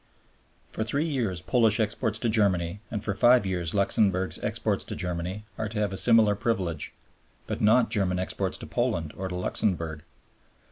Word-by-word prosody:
For 110 - -2
three 140 +8 0
years 115 - -2
Polish 110 +1 +3
exports 110 0 -1
to 115 - -2
Germany, 100 -5 +1
and 105 -2 -4
for 100 - -1
five 120 +2 +5
years 90 -2 -2
Luxemburg's 95 -1 +1
exports - - -1
to - - -6
Germany, 90 +3 -3 0.2
are 110 -1 -2
to 105 - -6
have 105 -2 0
a - - -3
similar 110 0 +5
privilege, 95 -7 -2 0.5
but - - -4
not 110 +2 +4
German 95 -5 +1
exports 90 - -2
to - - -9
Poland 80 -2 -1
or 95 - -4
to 90 - -5
Luxemburg. 85 -4 -1
100 Hz, 170 wpm, -27 LUFS, 90-110 Hz, 0.5 s, five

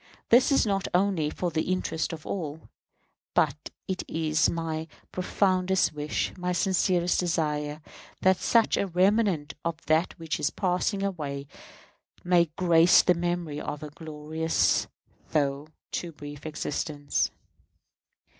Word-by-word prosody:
This 245 +5 +6
is 275 - +4
not 195 -2 0
only 180 -5 +2
for 175 +2 -3
the 160 0 0
interest 170 -3 -1
of 160 -2 -8
all, 160 -4 -4 0.7
but - - +1 0.2
it 190 -2 -2
is 155 -1 +1
my 160 -1 -3 0.2
profoundest 185 0 +1
wish, 150 0 -2
my 180 0 -2
sincerest 180 -1 +2
desire, 150 -3 -1 0.4
that 190 0 +5
such 230 -2 +3
remnant 185 -4 +2
of 170 -1 -2
that 160 +4 +1
which 165 -2 -3
is 145 - +1
passing 195 +1 0
away 145 -8 -3 0.8
may 175 -1 +4
grace 170 -1 +6
the 180 - +4
memory 175 -3 -2
of 145 +1 -5
a 150 - -7
glorious 155 +1 0 0.5
though 140 -1 0 0.2
too 175 - -3
brief 145 0 -9
existence. 145 -1 -2
165 Hz, 125 wpm, -27 LUFS, 150-185 Hz, 0.8 s, This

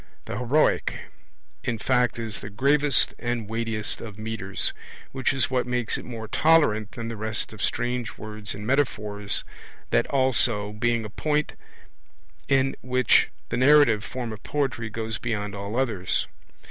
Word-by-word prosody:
The 100 - -4
heroic; 130 +5 +2 0.7
in 120 - -1
fact 125 0 +1
is 115 -2 -5
the 100 - -7
gravest 140 +5 +3
and 120 -3 -2
weightiest 110 -1 -2
of 110 -3 -8
metres 110 -3 -1 0.4
which 130 -1 0
is 130 -4 0
what 125 -1 +1
makes 125 -2 +1
it - - -5
more 115 -3 -6
tolerant 120 -5 +3
than 115 -1 -5
the 115 - -4
rest 110 +1 -2
of 110 - -9
strange 120 0 -1
words 105 -1 -6
and 105 +1 -7
metaphors, 105 -6 0 0.5
that - - +3
also 120 -6 +2
being 115 +1 0
a - - -6
point 150 +5 0 0.9
in 135 0 +2
which 130 -1 +3 0.2
the - - -1
narrative 130 -5 +5
form 120 -1 -5
of 105 - -10
poetry 130 -6 -2
goes 110 0 -4
beyond 105 -4 -2
all 100 +2 -5
others. 110 -9 0
115 Hz, 150 wpm, -25 LUFS, 105-130 Hz, 0.9 s, narrative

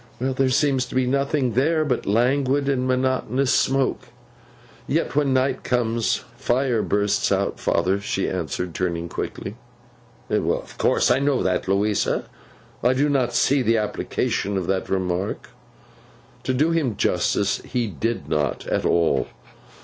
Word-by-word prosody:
'There 130 +1 +1
seems 135 0 +2
to - - -9
be 130 0 +2
nothing 140 -1 0
there 155 +6 +2
but 130 -4 -1
languid 130 +6 +2
and 130 -2 +1
monotonous 130 0 +1
smoke. 135 -1 +1 0.8
Yet 160 -1 -1
when 145 -2 +2
the 130 - +4
night 130 0 -1
comes, 115 -2 0
Fire 120 -2 +1
bursts 105 0 +1
out, - - 0
father!' 95 +4 +1
she 95 -1 -1
answered, 90 0 -3
turning 85 -1 -2
quickly. - - -5 0.7
'Of - - -1
course - - +3
I 125 - +3
know 140 -1 +1
that, 90 0 0
Louisa. 100 +2 +1 0.6
I 125 +2 +3
do 140 +3 +1
not 125 -4 +1
see 135 +3 +3
the 115 -2 +2
application 100 -1 -1
of 95 - -2
the 95 +1 0
remark.' 95 0 -2 0.9
To 130 - +1
do 155 +6 +2
him 145 -10 0
justice 100 -1 +1
he 120 -1 -1
did 115 +3 -3
not, 75 -3 -1
at - - 0
all. 80 -6 +2
125 Hz, 145 wpm, -23 LUFS, 100-135 Hz, 0.9 s, the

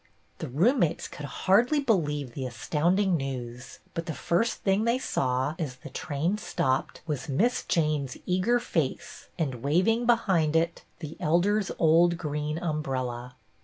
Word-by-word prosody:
The - - -4
roommates 175 - +2
could 145 - -8
hardly 235 - +3
believe 150 - 0
the 130 0 -4
astound 150 - 0
ing 190 -3 +2
news, 125 -4 -5 0.2
but 165 - -4
the 160 - -3
first 225 +8 0
thing 195 +2 +2
they 235 +2 +2
saw, 130 - 0
as 145 -6 -3
the - - -11
train 165 +8 -2
stopped, 130 -9 -1
was 150 -4 -4
Miss 220 - +2
Jane's 150 -5 0
eager 185 +7 +2
face 170 - -3
and, 135 -8 -2
waving 185 - +2
behind 190 -10 +3
it, 165 +1 +1 0.2
the 155 -1 -7
Elder's 190 +6 +2
old 170 +2 +4
green 150 -1 -3
umbrella. 130 -7 -3
160 Hz, 145 wpm, -27 LUFS, 140-190 Hz, 0.2 s, old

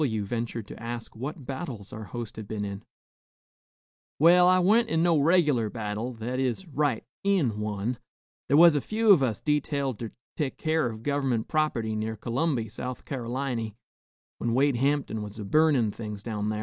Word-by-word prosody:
W 110 -8 0
ventured 115 0 -3
to - - -10
ask 115 0 -6
what 135 +4 -6
battles 130 - -6
our 110 -1 -6
host 120 0 -6
had 110 -2 -7
been 105 -1 -3
in. 100 0 -5 1.4
"Well, 175 +3 +6
I 185 0 +6
wa'n't 220 +6 +4
in 160 -3 +2
no 170 -3 +4
reg'lar 145 -8 +3
battle, 110 +2 -3
that 120 +3 -4
is, 130 +8 -1
right 145 -5 0 0.2
in 165 - +2
one. 105 +3 -2 0.5
Thar 140 - +5
was 170 0 +8
a 145 - +1
few 220 - +3
of 180 -8 +7
us 115 -6 0
detailed 140 -4 0
ter 115 - -4 0.3
tek 145 -4 -2
keer 155 -3 +1
of 110 -1 -7
gov'ment 135 -5 0
prop'ty 120 -8 0
near 110 +1 -3
C'lumby, 120 +1 -1
South 125 +2 -6
Car'liny, 120 -3 -3 0.6
when 115 0 0
Wade 140 -1 +3
Hamptin 135 -4 0
was 105 +1 -7
a 105 - -5
burnin' 145 -3 +3
things 105 -2 -7
down 105 -2 -2
thar. 105 0 -2
125 Hz, 175 wpm, -27 LUFS, 110-150 Hz, 1.4 s, was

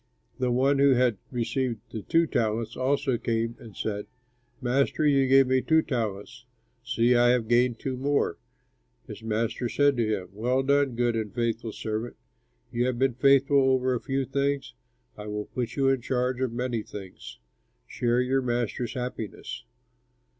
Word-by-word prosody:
"The 125 -1 +1
one 135 +3 +2
who 140 -1 +5
had 120 -4 +2
received 120 -1 -2
the 110 - -5
two 165 +10 +2
talents 115 -4 -1
also 135 -1 0
came 115 0 -1
and 110 -4 -12
said, 105 -1 -3 0.5
'Master, 135 +4 +1
you 135 -2 +4
gave 135 +1 +6
me 130 0 +2
two 160 +3 +3
talents. 120 +1 -4 0.4
See, 120 -1 +2
I 120 0 +5
have 120 -2 +2
gained 120 0 +3
two 130 +2 -4
more.' 140 - 0 0.7
His - - -9
master 115 +2 -2
said 145 +1 +3
to 115 -2 +1 0.2
him, - - -16
'Well 125 +6 0
done, 140 -2 +2
good 120 0 +1
and 110 -2 -3
faithful 115 0 -2
servant! 110 +2 -4 0.6
You 120 +1 0
have 125 -2 -1
been 130 0 +2
faithful 140 +2 +4
over 130 -1 +2
a 120 - -2
few 135 0 -1
things, 140 - -1 0.5
I 105 - -7
will 105 0 -4
put 120 -2 -4
you 135 -1 +2
in 135 -2 +1
charge 125 +1 -1
of 130 -3 0
many 120 -1 -2
things. 95 -3 -10 0.5
Share 120 +1 0
your 130 +1 +1
master's 120 -1 -2
happiness.' 125 - -5
125 Hz, 165 wpm, -27 LUFS, 115-135 Hz, 0.7 s, gave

